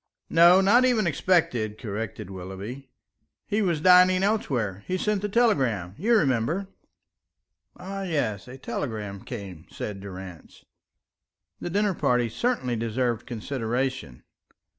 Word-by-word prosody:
"No, 175 Hz, +3 st, +7 dB
not 215 Hz, +6 st, +5 dB
even 245 Hz, -5 st, +3 dB
expected," 135 Hz, -, +1 dB
corrected 105 Hz, -3 st, -5 dB
Willoughby. 95 Hz, +9 st, -8 dB, 0.6 s
"He 215 Hz, +1 st, 0 dB
was 175 Hz, -6 st, +1 dB
dining 185 Hz, +1 st, +6 dB
elsewhere. 125 Hz, -, -1 dB
He 185 Hz, -, -1 dB
sent 210 Hz, +1 st, 0 dB
the 205 Hz, -, -2 dB
telegram, 130 Hz, -, +1 dB
you 230 Hz, -, +3 dB
remember." 150 Hz, -, +1 dB, 1.1 s
"Ah, 195 Hz, +1 st, -6 dB
yes, 145 Hz, -, -2 dB
a 125 Hz, +1 st, -9 dB
telegram 105 Hz, -7 st, -5 dB
came," 95 Hz, -8 st, -8 dB
said 105 Hz, -2 st, -6 dB
Durrance. 95 Hz, -3 st, -10 dB, 0.9 s
That -, -, -4 dB
dinner 205 Hz, 0 st, +2 dB
party 125 Hz, -7 st, +1 dB
certainly 130 Hz, -, -1 dB
deserved 115 Hz, +1 st, -1 dB
consideration. 125 Hz, -, -3 dB
130 Hz, 120 wpm, -26 LUFS, -, 1.1 s, No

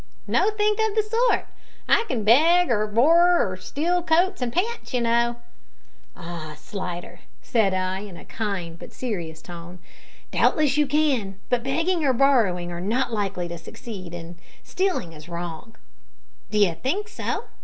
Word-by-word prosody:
"Nothink 425 Hz, 0 st, +2 dB
of 440 Hz, -1 st, +1 dB
the 435 Hz, -, +3 dB
sort; 460 Hz, +3 st, +2 dB, 0.4 s
I -, -, +4 dB
can 230 Hz, -, -2 dB
beg 320 Hz, +9 st, +5 dB
or 215 Hz, -2 st, +2 dB
borrer 335 Hz, -, +5 dB
or 185 Hz, -, -4 dB
steal 335 Hz, -, -1 dB
coats 345 Hz, +1 st, +2 dB
and 245 Hz, -1 st, -1 dB
pants, 405 Hz, -, -2 dB
you 245 Hz, -, +1 dB
know." 235 Hz, 0 st, +2 dB, 0.8 s
"Ah, 165 Hz, -3 st, -7 dB
Slidder!" 175 Hz, +2 st, -6 dB, 0.2 s
said 210 Hz, -6 st, +2 dB
I, 185 Hz, 0 st, -1 dB
in 195 Hz, -4 st, -9 dB
a -, -, -12 dB
kind 185 Hz, -7 st, -4 dB
but -, -, -10 dB
serious 170 Hz, -10 st, -5 dB
tone, 175 Hz, 0 st, -9 dB, 0.5 s
"doubtless 295 Hz, -4 st, +3 dB
you 295 Hz, -1 st, +3 dB
can, 265 Hz, -10 st, +1 dB
but 245 Hz, -1 st, +2 dB
begging 330 Hz, +6 st, 0 dB
or 270 Hz, -2 st, +3 dB
borrowing 225 Hz, -10 st, +3 dB
are 175 Hz, 0 st, -5 dB
not 235 Hz, +6 st, 0 dB
likely 195 Hz, -4 st, -2 dB
to 170 Hz, 0 st, -6 dB
succeed, 185 Hz, 0 st, -8 dB
and 170 Hz, 0 st, -9 dB, 0.2 s
stealing 365 Hz, -, -1 dB
is 155 Hz, +2 st, -12 dB
wrong." 170 Hz, +5 st, -6 dB, 0.7 s
"D'you 205 Hz, -5 st, +3 dB
think 310 Hz, -, -2 dB
so?" 435 Hz, -, -3 dB
230 Hz, 155 wpm, -24 LUFS, -, 0.8 s, beg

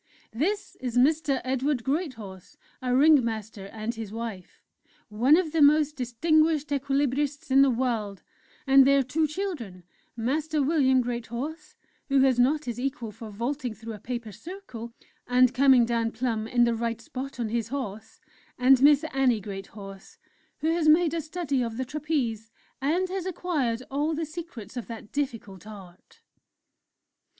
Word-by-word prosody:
"This 395 Hz, -, -2 dB
is 245 Hz, -2 st, -3 dB
Mr. 285 Hz, +1 st, +2 dB
Edward 265 Hz, 0 st, -1 dB
Greathorse, 230 Hz, -, -4 dB, 0.2 s
our 250 Hz, -1 st, 0 dB
Ringmaster, 230 Hz, -8 st, +2 dB
and 220 Hz, +2 st, -4 dB
his 225 Hz, -3 st, -7 dB
wife, 220 Hz, -5 st, -7 dB, 0.5 s
one 245 Hz, +9 st, +4 dB
of 345 Hz, -4 st, 0 dB
the 325 Hz, -1 st, +1 dB
most 300 Hz, +1 st, +5 dB
distinguished 305 Hz, +4 st, +1 dB
Equilibrists 280 Hz, 0 st, -1 dB
in 270 Hz, +1 st, +6 dB
the 275 Hz, -, +5 dB
world, 230 Hz, -6 st, -2 dB, 0.4 s
and 270 Hz, 0 st, +7 dB
their 275 Hz, 0 st, +4 dB
two 305 Hz, +5 st, 0 dB
children, 295 Hz, -, -5 dB, 0.3 s
Master 295 Hz, +6 st, 0 dB
William 265 Hz, -3 st, +3 dB
Greathorse, 240 Hz, +6 st, -5 dB, 0.3 s
who 275 Hz, -1 st, +4 dB
has 260 Hz, -2 st, +3 dB
not 290 Hz, +5 st, +2 dB
his 240 Hz, -1 st, -4 dB
equal 260 Hz, -4 st, -3 dB
for 220 Hz, +1 st, -10 dB
vaulting 240 Hz, +3 st, -3 dB
through 225 Hz, +2 st, -8 dB
a 210 Hz, -, -9 dB
paper 235 Hz, 0 st, -5 dB
circle, 235 Hz, -, -9 dB, 0.4 s
and 250 Hz, 0 st, +4 dB
coming 260 Hz, -2 st, +5 dB
down 230 Hz, -1 st, 0 dB
plumb 225 Hz, -2 st, -2 dB
in 240 Hz, +1 st, +3 dB
the 235 Hz, 0 st, +3 dB
right 230 Hz, 0 st, -2 dB
spot 260 Hz, +3 st, -7 dB
on 230 Hz, -2 st, -1 dB
his 230 Hz, -1 st, -1 dB
horse 230 Hz, -5 st, -6 dB, 0.4 s
and 255 Hz, +1 st, +5 dB
Miss 290 Hz, +1 st, +6 dB
Annie 260 Hz, -4 st, +2 dB
Greathorse, 195 Hz, 0 st, -9 dB, 0.4 s
who 320 Hz, +1 st, +1 dB
has 330 Hz, -2 st, +2 dB
made 325 Hz, 0 st, +4 dB
a 335 Hz, -, -1 dB
study 310 Hz, -4 st, -2 dB
of 230 Hz, -2 st, -3 dB
the 260 Hz, -, -2 dB
Trapeze, 250 Hz, -7 st, -2 dB, 0.3 s
and 335 Hz, +7 st, +1 dB
has 375 Hz, -1 st, -3 dB
acquired 290 Hz, -10 st, -1 dB
all 295 Hz, +3 st, 0 dB
the 325 Hz, +1 st, -2 dB
secrets 305 Hz, -, -9 dB
of 245 Hz, -, -5 dB
that 225 Hz, -3 st, -9 dB
difficult 220 Hz, -, -4 dB
art." 190 Hz, -4 st, -13 dB
255 Hz, 155 wpm, -26 LUFS, 230-295 Hz, 0.5 s, and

